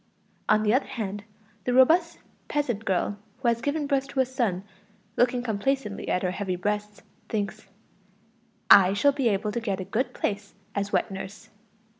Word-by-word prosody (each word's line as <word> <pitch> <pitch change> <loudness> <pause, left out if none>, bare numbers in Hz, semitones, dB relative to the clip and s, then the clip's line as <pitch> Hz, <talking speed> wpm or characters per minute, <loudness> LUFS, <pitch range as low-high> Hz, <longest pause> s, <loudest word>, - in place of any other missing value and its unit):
On 215 0 +4
the 210 0 +3
other 260 - +2
hand, 205 -3 -5 0.4
the 250 - +1
robust 330 +6 +5 0.3
peasant 240 -8 -1
girl 200 +1 0 0.2
who 255 -1 -2
has 235 0 0
given 290 +3 -1
birth 275 -1 0
to 275 - -4
a 260 - +5
son, 235 -8 -1 0.5
looking 245 0 +2
complacently 225 0 -2
at 180 - 0
her 180 - +1
heavy 190 -1 -2
breasts, 210 +2 -3 0.3
thinks: 215 0 -3 1.0
"I 195 -1 +8
shall 280 +8 +4
be 270 -4 +1
able 205 +1 0
to 235 - -2
get 200 -4 -2
a 185 - -4
good 245 +6 -1
place 200 -1 -3 0.2
as 200 0 -2
wet 185 0 +1
nurse." 195 +2 -8
215 Hz, 170 wpm, -26 LUFS, 200-260 Hz, 1.0 s, I